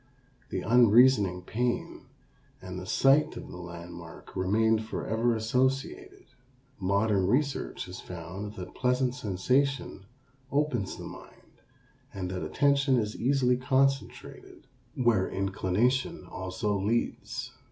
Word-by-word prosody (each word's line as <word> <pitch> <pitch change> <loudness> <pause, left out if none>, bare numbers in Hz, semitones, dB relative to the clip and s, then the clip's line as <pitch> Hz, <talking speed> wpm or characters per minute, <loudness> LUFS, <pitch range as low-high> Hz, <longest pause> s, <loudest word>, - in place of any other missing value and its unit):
The - - -3
unreasoning 115 -4 +5
pain 120 +5 -2 0.5
and 95 0 -7
the 90 - -8
sight 145 +8 +3
of - - -8
the - - -8
landmark 85 -1 -10
remained 110 +4 +2
forever 115 +1 -1
associated. 135 - -1 0.6
Modern 100 0 +2
research 140 +5 0
has 90 +1 -8
found 95 +4 -7
that 90 -4 -8
pleasant 125 0 +1
sensation 125 0 -1 0.4
opens 140 -8 0
the - - -8
mind - - -13 0.5
and 90 -2 -4
that 90 - -4
attention 140 -2 +2
is 105 -2 -1
easily 125 0 +2
concentrated 135 +1 -1 0.3
where 120 -6 +2
inclination 105 - 0
also 95 +2 -3
leads. 110 +5 -2
110 Hz, 110 wpm, -29 LUFS, 95-130 Hz, 0.6 s, unreasoning